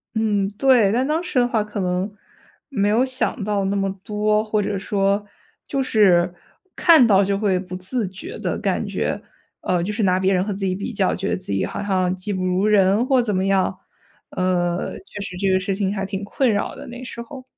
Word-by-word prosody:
嗯， 205 -3 +1
对。 245 -7 +4
但 255 +4 +1
当 315 +3 0
时 350 -8 0
的 245 - +3
话， 225 -4 0
可 210 -1 -6
能 180 +2 -1 0.6
没 205 -6 +1
有 235 +5 +3
想 260 -2 -1
到 205 -1 0
那 200 +1 0
么 195 -1 0
多。 210 0 +1
或 215 -1 0
者 200 0 -2
说 200 0 0 0.4
就 275 -1 -1
是 185 -7 +4 0.4
看 320 -8 +6
到 200 -3 +5
就 200 0 0
会 195 -3 +1
不 180 -1 -7
自 195 +4 -3
觉 190 0 -8
地 - - -2
感 - - -1
觉 - - -2 0.4
呃， 175 -2 0
就 205 - -2
是 220 0 -1
拿 185 -1 +3
别 190 +1 +2
人 180 0 +2
和 205 - -3
自 195 - -7
己 185 - 0
比 200 +5 -4
较 195 -2 +1
觉 195 +2 -3
得 - - +1
自 180 - -7
己 95 - 0
好 - - -5
像 185 -2 +1
技 190 +3 -4
不 185 -1 -2
如 185 +2 +1
人 205 +2 +4
或 260 -2 +3
怎 210 -5 -1
么 185 - +1
样， 190 -1 +1 0.5
呃， 180 -1 -1
确 285 - -11
实 190 -2 -6
这 195 0 0
个 185 - +3
事 190 +1 -2
情 200 0 -1
还 195 -1 -2
挺 195 +1 -4
困 250 +5 0
扰 205 - -1
的， - - -10
那 245 +1 -8
时 235 -1 -7
候。 255 +2 -10
200 Hz, 240 characters per minute, -22 LUFS, 190-220 Hz, 0.6 s, 看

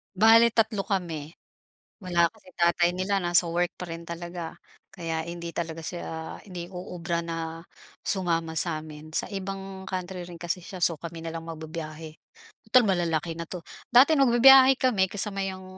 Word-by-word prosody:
Bale, 225 +3 +6
tatlo 220 -3 +1
kami. 165 -6 -3 0.7
Wala 175 -3 +2
kasi 215 -4 -19
tatay 175 0 +3
nila, 195 +2 0
nasa 175 0 +4
work 175 +1 0
pa 180 - -7
rin 165 0 -7
talaga 170 0 -6 0.4
kaya 165 -3 -3
hindi 170 0 -6
talaga 165 -1 -4
siya, 160 -2 -6
hindi 175 -3 -7
uubra 175 -2 -4
na 165 0 -5 0.4
sumama 165 -4 0
sa 160 -2 +1
amin. 155 0 -11
Sa - - +1
ibang 195 0 -6
country 185 -1 -4
rin 175 -1 -10
kasi 175 +1 -2
siya, 185 - -8
so 165 -3 +3
kami 170 -1 -7
na 165 - -4
lang 165 0 -6
magbibiyahe, 160 -1 -7 0.5
tutal 250 +3 +6
malalaki 170 -3 0
na 170 - -4
'to. 180 -2 -6 0.3
Dati 260 +6 +7
nagbibiyahe 265 0 +7
kami 205 -8 +2
kasama 200 -1 -1
yung 185 0 -8
175 Hz, 160 wpm, -27 LUFS, 165-195 Hz, 0.7 s, Dati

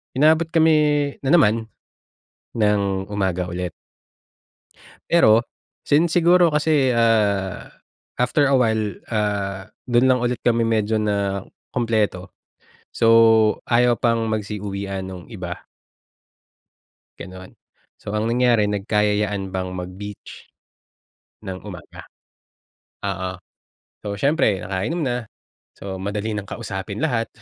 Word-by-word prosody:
inabot 160 +4 +3
kami 150 -3 +3
na 135 - 0
naman, 110 -6 +3 0.9
ng 100 -3 0
umaga 95 -3 -1
ulit. 90 0 -4 1.4
Pero 115 -10 +5 0.5
since 160 +3 +3
siguro 175 0 +5
kasi, 150 -3 +2
ah, 105 -5 +1 0.5
after 125 +4 +2
a - - +5
while, 110 -3 +2 0.2
ah, 100 -2 -2 0.2
do'n 120 +1 +3
lang 130 -1 +3
ulit 120 0 -1
kami 115 -1 +2
medyo 110 -1 +1
nakumpleto, 100 0 -2 0.6
so 115 - +1 0.6
ayaw 120 0 +4
pang 115 -1 0
magsi-uwian 100 -3 -4
'nung 90 -2 -8
iba. 90 -5 -7 1.6
Gano'n, 95 0 -10 0.5
so 100 - -7
ang 110 +1 0
nangyari, 120 -3 +3
nagkayayaan 105 -1 0
pang 95 -1 -4
mag-beach 95 +3 -9 0.9
ng 95 -1 -6
umaga. 95 -4 -10 1.0
Oo. 95 -2 -3 0.7
So, 100 -1 -5
siyempre 110 - +1
nakainom 100 - -2
na, 120 -3 -2 0.5
so 95 -1 -7
madali 105 +3 -3
nang 105 -2 -4
kausapin 100 +3 -5
lahat, 120 -7 0
105 Hz, 105 wpm, -22 LUFS, 100-125 Hz, 1.6 s, Pero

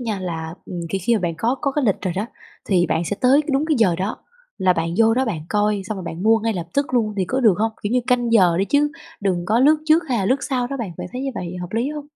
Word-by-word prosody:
nha 220 -5 -3
là 165 -2 -5
ừm, 175 -2 -5
thì 195 - -1
khi 235 +6 +1
mà 220 - +1
bạn 170 -2 -1
có 235 +7 +1
có 280 - 0
cái 295 -1 0
lịch 205 -5 +1
rồi 185 -3 -1
đó, 205 - -1 0.4
thì 180 -3 +2
bạn 160 +2 0
sẽ 205 - -3
tới 260 +3 +5
đúng 275 +3 +1
cái 310 - +2
giờ 195 -7 +4
đó 195 +3 -2 0.4
là 185 -1 +3
bạn 165 -1 -2
vô 225 0 +5
đó 260 +2 +1
bạn 195 -10 -3
coi, 210 -1 +1
xong 210 +2 -4
rồi 185 - -6
bạn 170 +2 -6
mua 225 +1 +4
ngay 225 +1 -1
lập 170 -2 -4
tức 280 -2 0
luôn 215 -3 +1
thì 190 - +1
có 260 +8 -1
được 220 -7 +5
hông? 220 +1 0
Kiểu 205 +3 -2
như 250 - +3
canh 245 -2 +1
giờ 180 -7 +5
đi 195 - +2
chứ 290 +6 +2 0.3
đừng 185 -4 0
có 225 +5 +2
lướt 300 +4 +5
trước 315 +2 +4
hay 245 -4 +1
là 195 - 0
lướt 260 +6 +1
sau 250 -3 -1
đó 275 - -4
bạn, 220 -9 -5
bạn - - -5
thấy 250 - -4
như 270 - -2
vậy 180 -2 -5
hợp 180 +2 -7
lý 235 +4 0
hông? 295 -1 -7
215 Hz, 305 wpm, -21 LUFS, 185-250 Hz, 0.4 s, tới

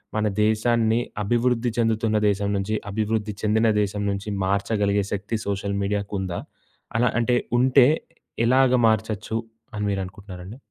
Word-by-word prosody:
మన 110 0 +1 0.2
దేశాన్ని 110 +1 +2 0.2
అభివృద్ధి 120 +2 +1
చెందుతున్న 110 -1 +1
దేశం 100 0 0
నుంచి 100 +3 -1
అభివృద్ధి 110 0 -1
చెందిన 110 +2 +2
దేశం 105 0 -2
నుంచి 100 +2 -4 0.2
మార్చగలిగే 100 +1 +1
శక్తి 100 +3 -2
సోషల్ 100 0 -2
మీడియాకుందా? 100 -3 -2 0.6
అలా 120 0 +3
అంటే 120 +1 +2 0.2
ఉంటే 130 0 +6 0.6
ఎలాగా 130 +1 +4
మార్చచ్చు 110 0 -1 0.4
అని 105 - -2
మీరనుకుంటున్నారండి? 95 +1 -6
105 Hz, 120 wpm, -24 LUFS, 100-115 Hz, 0.6 s, ఉంటే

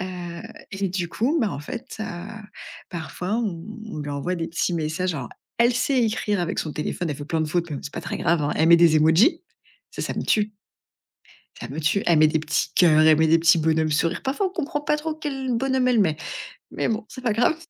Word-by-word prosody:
heu 180 -1 -6 0.3
et 195 -1 -2
du 175 -2 -2
coup, 270 - 0
bah, 220 - +1
en 140 - -5
fait, 235 - -7
heu, 220 - -2 0.8
parfois, 180 +3 -4
on 185 -8 -3 0.2
on 155 - -7
lui 145 -1 -5
envoie 145 +6 -2
des 165 -1 -3
petits 165 +2 -1
messages. 165 +3 -1
Alors, 130 -4 -5 0.3
elle 235 +1 +4
sait 250 0 +2
écrire 210 -3 0
avec 175 - -2
son 155 - -2
téléphone 155 +2 -3
elle 140 - -3
fait 145 - -7
plein 160 0 -1
de 155 - -3
fautes, 170 0 -1
mais 145 - -3
c'est 145 - -7
pas - - -5
très - - -4
grave, 170 -2 +2
hein. 145 - 0
Elle 160 +1 +3
met 170 - +9
des 165 -2 +5
émojis. 160 - +4 0.5
Ça, - - -6
ça - - -3
me - - -2
tue! 210 0 +1 1.1
Ça - - -6
me 140 +4 -7
tue. 170 +6 +1
Elle 170 -3 +4
met 155 - +7
des 155 +1 +1
petits 155 - -1
cœurs, 160 -4 +5
elle 155 -1 +6
met 160 - +4
des 165 +1 +5
petits 170 +1 +5
bonhommes 160 0 +1
sourire, 165 +3 0
parfois 280 +9 0
on - - -3
comprend 325 -4 -3
pas 300 +1 +1
trop 310 +1 -3
quel 270 -4 -3
bonhomme 260 +1 +1
elle 240 -3 +3
met 160 -6 +2 0.6
mais - - -1
bon, 220 0 -2
c'est 255 - -10
pas 230 -4 +1
grave! 245 +8 +2
175 Hz, 235 wpm, -24 LUFS, 160-235 Hz, 1.1 s, met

